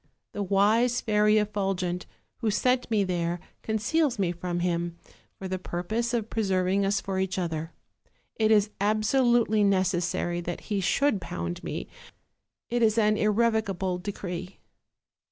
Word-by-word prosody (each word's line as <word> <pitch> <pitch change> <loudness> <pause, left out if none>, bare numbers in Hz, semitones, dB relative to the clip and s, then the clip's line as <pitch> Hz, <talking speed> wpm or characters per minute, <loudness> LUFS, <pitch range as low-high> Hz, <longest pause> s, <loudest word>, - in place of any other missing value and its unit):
The 205 - -4
wise 215 +5 +3
Fairy 210 0 +3
Effulgent, 195 -4 -1 0.3
who 230 - -1
sent 250 +4 +1
me 215 -3 +2
there 175 -2 -1 0.2
conceals 240 +6 0
me 190 -4 +1
from 175 0 -3
him, 170 -1 -1 0.4
for 190 - -6
the 185 0 -3
purpose 215 +7 -2
of 230 -3 -1
preserving 195 -3 +1
us 200 +1 +1
for 190 -1 -3
each 190 0 -1
other: 165 -2 -3 0.6
it 220 -1 +2
is 210 -1 +4
absolutely 220 +1 +3
necessary 180 -3 +1
that 175 0 -5
he 200 -2 +1
should 210 +2 +2
pound 175 +1 -5
me, - - -4 0.8
it 240 0 -1
is 220 -1 +3
an 215 -1 +4
irrevocable 210 -4 +1
decree." 185 -1 -6
200 Hz, 135 wpm, -27 LUFS, 180-220 Hz, 0.8 s, is